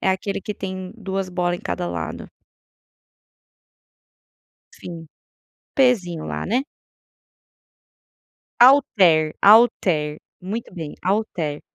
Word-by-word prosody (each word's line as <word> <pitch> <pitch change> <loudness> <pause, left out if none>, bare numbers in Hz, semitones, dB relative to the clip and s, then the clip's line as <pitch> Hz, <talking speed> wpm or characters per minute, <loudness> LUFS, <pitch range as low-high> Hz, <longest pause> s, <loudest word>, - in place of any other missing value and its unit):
é - - 0
aquele 195 +1 -3
que 210 +1 -6
tem 185 -1 -6
2 195 -3 -4
bola 180 -1 -1
em - - -13
cada 85 0 -4
lado. 85 -2 -6 2.4
Sim, 165 -2 -10 0.7
pesinho 190 - +1
lá, - - -4
né. 240 +7 +1 2.0
Alter, 190 - +5
alter, 185 -8 +4 0.2
muito 205 +6 -6
bem, 160 -5 -7
alter, 180 -7 -2
185 Hz, 90 wpm, -21 LUFS, 160-210 Hz, 2.4 s, Alter